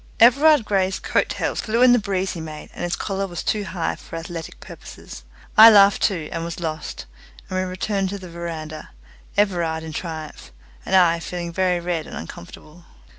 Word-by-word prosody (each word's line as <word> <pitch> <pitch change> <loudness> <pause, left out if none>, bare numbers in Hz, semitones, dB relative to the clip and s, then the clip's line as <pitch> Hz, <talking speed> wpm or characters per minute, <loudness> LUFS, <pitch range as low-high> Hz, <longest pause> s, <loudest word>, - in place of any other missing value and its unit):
Everard 280 +2 +6
Grey's 190 -2 0
coat - - 0
tails - - -2
flew 230 +3 +1
in 250 -1 +7
the 245 - +4
breeze 195 -2 -2
he 165 - -6
made, 155 -1 -9
and - - -7
his 175 0 -1
collar 195 -1 -3
was 175 -2 -6
too 210 -2 -1
high 180 -3 -3
for - - -11
athletic 165 0 -7
purposes. - - -11 0.3
I 220 +1 +11
laughed 200 -2 +6
too, 170 -6 0
and 165 -1 -3
was 170 +1 -5
lost, 155 - -5 0.5
and 185 - -1
we - - 0
returned 190 +1 -2
to 200 - -4
the 185 -2 -10
veranda 165 -2 -7 0.5
Everard 170 -6 +1
in 160 -1 -7
triumph, 155 - -7 0.4
and - - +2
I 170 -2 +5
feeling 170 0 -5
very 180 -1 +1
red 170 -2 -3
and - - -8
uncomfortable. 150 - -11
175 Hz, 185 wpm, -22 LUFS, 165-195 Hz, 0.5 s, I